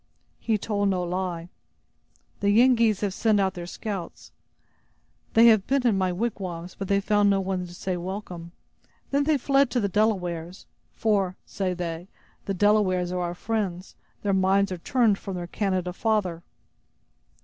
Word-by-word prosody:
"He 225 -2 0
told 205 -1 0
no 185 -2 0
lie. 175 -1 -3 0.9
The 200 - +1
Yengeese 230 -1 +4
have 200 -3 -1
sent 215 0 +2
out 190 -1 +1
their 175 -2 -7
scouts. 195 -3 -6 1.0
They 225 +1 +7
have 220 -4 +5
been 270 -1 +1
in 230 -4 +4
my 185 -1 +1
wigwams, 180 -4 -4
but 195 - -6
they 200 +1 +3
found 205 0 +2
there 200 -1 +4
no - - 0
one 185 -1 -2
to 175 - -12
say 185 0 -3
welcome. 175 -2 -6 0.6
Then 280 +1 +2
they 305 -1 +3
fled 275 0 +3
to 250 - 0
the 205 - +1
Delawares—for, 190 0 -1
say 185 -2 -2
they, 170 0 -5 0.4
the 195 - -1
Delawares 185 -3 +2
are 180 0 -2
our 175 0 -3
friends; 195 -3 -3 0.3
their 200 -1 +1
minds 190 +1 +3
are 180 - -4
turned 225 0 +2
from 195 -2 -6
their 175 -1 -4
Canada 185 -1 -2
father!" 190 -5 0
195 Hz, 160 wpm, -26 LUFS, 180-215 Hz, 1.0 s, They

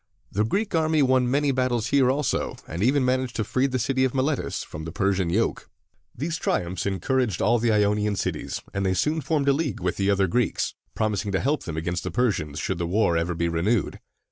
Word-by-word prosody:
The 105 - +1
Greek 200 - -1
army 160 -2 +3
won 130 -1 +3
many 140 +2 +2
battles 125 -3 0
here 140 -3 +4
also, 140 +1 0
and 85 +3 -5
even 130 +4 +3
managed 130 -1 0
to 110 - 0
free 130 +6 +1
the 130 -1 -1
city 130 +2 +1
of 130 0 0
Miletus 135 +2 -1
from 80 - -8
the 80 - -6
Persian 95 -1 0
yoke. 110 +7 -1 0.5
These 160 +6 -2
triumphs 90 - -1
encouraged 105 +2 0
all 120 +2 +3
the 115 0 +2
Ionian 105 0 +2
cities, - - -3
and 100 - -1
they 95 -1 +1
soon 150 - +1
formed 150 -2 0
a 140 - +5
league 145 -1 -2
with 90 0 -2
the 100 0 +1
other 100 -1 +3
Greeks, 110 +2 0 0.2
promising 105 -2 -1
to 95 - +2
help 145 +4 0
them 80 -3 -5
against 85 +2 -2
the 90 - -3
Persians 85 -8 0
should 95 +1 -2
the 85 - -1
war 90 -2 +2
ever 85 +1 0
be 85 +1 0
renewed. 90 +6 0
110 Hz, 215 wpm, -25 LUFS, 95-130 Hz, 0.5 s, a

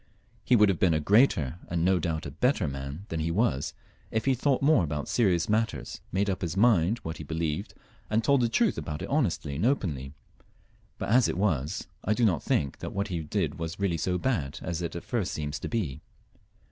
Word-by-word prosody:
He 125 - +4
would 105 -2 +6
have 95 - 0
been 85 -4 +3
a - - +2
greater 85 - +3
and 85 -1 0
no 95 -1 +3
doubt 80 -1 -2
a 70 - -5
better 100 - +1
man 70 +6 -6
than 80 - -2
he 80 +1 -1
was, 85 - 0 0.3
if 110 0 -1
he 135 - +4
had 130 - -1
thought 135 -1 +2
more 145 - +5
about 75 -2 -3
serious 90 -8 +2
matters, 105 - -1
made 100 +2 +1
up 95 -2 -1
his 90 +1 -3
mind 105 -2 +4
what 80 0 -5
he - - -7
believed, 80 0 -3 0.3
and 110 +1 +1
told 140 0 +4
the 120 - +2
truth 225 - +2
about 75 -1 -5
it - - -5
honestly 90 - 0
and 85 - 0
openly; 75 - -1 0.8
but - - -4
as 120 +2 +5
it - - -2
was, 85 -5 0 0.2
I 105 - +1
do 120 - +3
not 85 -9 +2
think 70 -2 0
that - - -6
what 100 +1 -2
he 85 -3 -2
did 80 0 -2
was 80 +3 -4
really 95 -4 +1
so 90 +3 0
bad 80 - -1
as 85 -1 -3
it 85 - -4
at 85 - -5
first 110 - -2
seems 75 -1 -3
to - - -4
be. 100 - -2
90 Hz, 225 wpm, -28 LUFS, 80-110 Hz, 0.8 s, would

